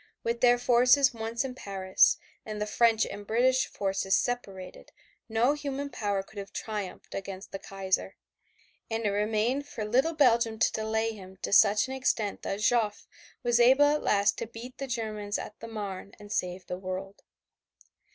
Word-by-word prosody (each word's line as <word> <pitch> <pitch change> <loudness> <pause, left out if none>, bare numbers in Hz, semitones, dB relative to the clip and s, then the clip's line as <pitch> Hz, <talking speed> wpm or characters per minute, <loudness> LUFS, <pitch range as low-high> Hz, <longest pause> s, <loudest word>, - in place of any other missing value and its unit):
With 235 0 -2
their 245 -1 +6
forces 250 +3 +4
once 230 +2 -3
in 260 - -4
Paris 195 -5 +2 0.3
and 215 -1 -6
the 210 - -1
French 225 0 +3
and 205 0 -8
British 255 +3 +3
forces 195 -1 0
separated 195 -7 -4 0.4
no 230 +5 +3
human 280 -1 -4
power 205 -5 -1
could 205 +1 -11
have 195 -1 -8
triumphed 210 -4 -6
against 195 0 -6
the 195 - -5
Kaiser 190 -1 -2 0.7
and 225 0 -2
it - - +3
remained 220 +7 0
for 225 -7 -5
little 265 +9 +2
Belgium 235 -6 +3
to 225 - +3
delay 220 +1 -1
him 190 -3 -11
to - - -2
such 210 0 +6
an 265 - -5
extent 240 -6 -1
that 200 +2 -3
Joffre 220 -4 0 0.4
was 240 0 +2
able 260 +4 +6
at 295 +1 +2
last 200 -1 +2
to 230 - -4
beat 235 +3 -10
the 275 - -4
Germans 215 -4 -3
at 210 - -8
the 230 - -8
Marne 200 -3 -6
and 205 0 -12
save 180 -1 -2
the 180 +1 -5
world. 190 +1 -6
220 Hz, 170 wpm, -28 LUFS, 200-245 Hz, 0.7 s, their